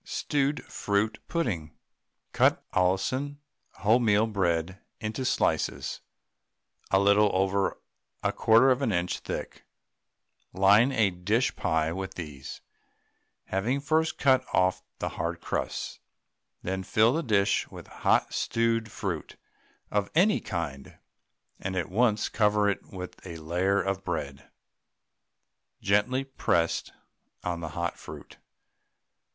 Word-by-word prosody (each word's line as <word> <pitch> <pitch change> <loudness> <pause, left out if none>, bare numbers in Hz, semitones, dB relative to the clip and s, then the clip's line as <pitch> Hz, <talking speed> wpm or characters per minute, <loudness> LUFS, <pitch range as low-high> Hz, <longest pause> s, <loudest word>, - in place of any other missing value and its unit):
STEWED 145 -1 -1
FRUIT 100 +2 -1
PUDDING. 90 - -2 0.6
Cut - - +3
Allinson 130 +11 0 0.4
wholemeal 110 -1 +3
bread 90 -1 0 0.2
into 110 +5 -3
slices - - 0 0.9
a 95 - +4
little 100 +1 +5
over 95 +1 +1 0.5
a - - +1
1/4 115 +4 +5
of 130 +2 +1
an 130 -5 +1
inch 85 -1 -1
thick, - - -6 0.9
line 100 +7 +5
a 110 -6 +2
pie 90 - -13
dish 105 +8 +1 0.4
with 95 0 -5
these, 75 -6 -8 0.8
having 110 +9 0
first 155 +3 +1
cut 130 -2 +4
off 95 0 +2 0.2
the - - -2
hard - - -3
crusts. - - -3 0.6
Then 95 +1 -2
fill 110 +5 +3
the 165 - 0
dish 100 -8 +2
with - - -10
hot - - +1
stewed 115 -1 0
fruit 95 -8 -4 0.6
of 105 -1 0
any 200 +6 +4
kind, 75 -7 -5 0.6
and 95 0 -4
at 90 -2 -2
once 110 +1 +2
cover 105 -1 +2
it 100 - -2
with 90 -2 -9
a 85 -3 -7
layer 90 +5 +1
of 95 +1 -2
bread, 70 -6 -4 1.3
gently 105 +7 +2
pressed 85 -11 0 0.5
on 85 -1 -2
the 85 -1 -5
hot 85 0 -2
fruit. - - -11
100 Hz, 120 wpm, -28 LUFS, 90-115 Hz, 1.3 s, little